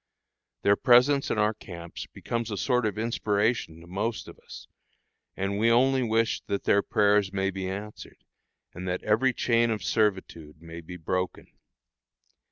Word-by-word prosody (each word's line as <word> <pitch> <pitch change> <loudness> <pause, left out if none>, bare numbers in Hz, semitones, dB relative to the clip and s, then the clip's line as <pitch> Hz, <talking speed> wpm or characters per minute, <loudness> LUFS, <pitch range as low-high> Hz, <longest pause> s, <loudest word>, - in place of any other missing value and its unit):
Their 100 - +5
presence 135 +4 +4
in - - -1
our 105 +1 +2
camps 85 -5 -9
becomes 115 -1 -4
a 105 - -4
sort 125 +1 +1
of 105 - -4
inspiration 110 -5 -1
to - - -13
most 100 +6 -3
of - - -12
us, - - -12 0.7
and 100 +1 -2
we 115 +2 +3
only 130 +3 +3
wish 115 -1 +1
that 100 -1 -2
their 100 - +3
prayers 105 -1 +2
may 95 0 -1
be 95 0 -4
answered, 105 +2 -8 0.5
and 90 +2 -7
that 90 0 -2
every 115 +5 +2
chain 115 -1 +1
of 110 -2 -2
servitude 95 -8 -1
may 85 0 -9
be 90 +2 -9
broken. 90 +2 -3
105 Hz, 160 wpm, -27 LUFS, 95-115 Hz, 0.7 s, Their